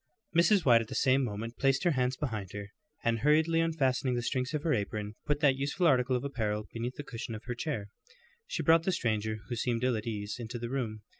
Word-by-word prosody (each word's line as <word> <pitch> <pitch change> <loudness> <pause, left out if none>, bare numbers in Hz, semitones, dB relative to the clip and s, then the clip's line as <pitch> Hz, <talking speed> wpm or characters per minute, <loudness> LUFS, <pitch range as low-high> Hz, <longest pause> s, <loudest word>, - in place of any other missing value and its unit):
Mrs. 175 +2 +4
White 120 -3 +6
at 115 - -6
the - - -6
same 135 0 +3
moment 115 0 -4
placed 135 +1 +2
her 175 - +4
hands 130 -2 0
behind 110 -10 -4
her, 100 0 -7 0.3
and 115 -1 +1
hurriedly 155 +5 +3
unfastening 135 -6 +1
the 120 - -1
strings 125 +1 -1
of 150 -1 -2
her 160 - +2
apron, 105 -1 -2
put 145 0 +1
that 140 -3 +5
useful 140 +6 0
article 130 -4 +4
of 125 - -1
apparel 110 -6 -2
beneath 120 +2 -3
the 145 - -6
cushion 115 -4 -6
of 110 - -9
her 125 - -3
chair. 120 -5 -3 0.6
She - - -2
brought 165 0 +6
the 190 - 0
stranger, 110 -4 -1
who 120 - -3
seemed 120 0 -1
ill 125 -1 +2
at 110 +1 -4
ease, 105 -1 -3
into 120 +1 -5
the 120 +1 -5
room. 110 -6 -3
125 Hz, 230 wpm, -31 LUFS, 110-140 Hz, 0.6 s, White